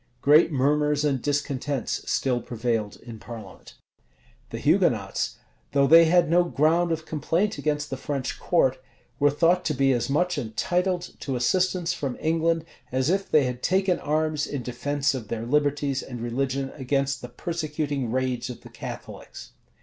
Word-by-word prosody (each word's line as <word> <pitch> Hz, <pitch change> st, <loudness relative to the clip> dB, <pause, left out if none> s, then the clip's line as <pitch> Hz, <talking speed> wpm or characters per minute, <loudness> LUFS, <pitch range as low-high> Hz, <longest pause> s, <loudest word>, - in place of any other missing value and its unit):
Great 150 Hz, +5 st, +5 dB
murmurs 150 Hz, +2 st, +2 dB
and 135 Hz, -4 st, +1 dB
discontents 140 Hz, -2 st, -2 dB
still 125 Hz, -2 st, +1 dB
prevailed 115 Hz, -3 st, -2 dB
in 115 Hz, -2 st, -9 dB
parliament. 115 Hz, -1 st, -11 dB, 0.7 s
The -, -, -5 dB
Hugonots, -, -, +1 dB, 0.4 s
though 140 Hz, -1 st, +4 dB
they 165 Hz, +4 st, +8 dB
had 170 Hz, +1 st, +4 dB
no 175 Hz, +3 st, +4 dB
ground 170 Hz, +1 st, +2 dB
of 160 Hz, -1 st, -2 dB
complaint 170 Hz, +7 st, -1 dB
against 150 Hz, -1 st, -1 dB
the 135 Hz, -, -2 dB
French 135 Hz, -1 st, -4 dB
court, 130 Hz, -7 st, +2 dB, 0.4 s
were 145 Hz, -, +5 dB
thought 170 Hz, +5 st, +2 dB
to 155 Hz, -, 0 dB
be 135 Hz, 0 st, +3 dB
as 120 Hz, 0 st, 0 dB
much 180 Hz, +3 st, +1 dB
entitled 175 Hz, +9 st, -1 dB
to 135 Hz, -, -3 dB
assistance 180 Hz, +7 st, +1 dB
from 140 Hz, -7 st, -4 dB
England, 165 Hz, 0 st, +1 dB, 0.3 s
as 130 Hz, +5 st, +1 dB
if 195 Hz, +1 st, -1 dB
they 150 Hz, -, +5 dB
had 125 Hz, -1 st, -3 dB
taken 190 Hz, -1 st, +2 dB
arms 155 Hz, 0 st, 0 dB
in 140 Hz, -4 st, -4 dB
defence 140 Hz, +4 st, -1 dB
of 125 Hz, -5 st, -5 dB
their 115 Hz, +1 st, -4 dB
liberties 145 Hz, 0 st, +1 dB
and 125 Hz, -2 st, -8 dB
religion 135 Hz, +3 st, -2 dB
against 140 Hz, 0 st, -1 dB
the 125 Hz, -, -7 dB
persecuting 150 Hz, -7 st, -3 dB
rage 130 Hz, -1 st, -1 dB
of 125 Hz, -, -8 dB
the -, -, -13 dB
Catholics. -, -, -9 dB
145 Hz, 155 wpm, -25 LUFS, 130-165 Hz, 0.7 s, they